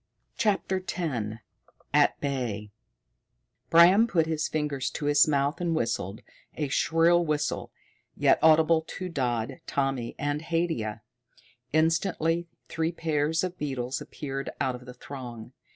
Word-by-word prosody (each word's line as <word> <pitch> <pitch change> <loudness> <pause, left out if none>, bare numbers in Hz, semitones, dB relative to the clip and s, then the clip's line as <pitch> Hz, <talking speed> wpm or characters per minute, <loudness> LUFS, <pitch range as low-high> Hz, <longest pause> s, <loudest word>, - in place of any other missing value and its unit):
CHAPTER 195 -3 +1
X 125 - -3 0.6
At - - +4
Bay 120 -7 -3 1.0
Bram 180 +7 +7
put 170 -8 +2
his 160 -1 -1
fingers 145 -4 -2
to 150 - -5
his 145 +1 +5
mouth 140 +2 +1
and 170 -2 0
whistled, 110 - -2 0.3
a 150 -3 -2
shrill 165 +4 +3
whistle, 150 -1 -2 0.5
yet - - +4
audible 160 0 +5
to 185 -1 -5
Dodd, 120 -3 -2
Tommy, 135 -4 -1
and 145 0 -1
Haidia. 160 -11 -2 0.7
Instantly 165 +1 +1 0.2
three 160 0 -1
pairs 160 -1 0
of 185 -1 -4
beetles 130 -3 -3
appeared 135 -2 -5
out 130 - 0
of 125 0 -9
the 125 0 -10
throng. 125 -3 -9
150 Hz, 125 wpm, -27 LUFS, 130-165 Hz, 1.0 s, Bram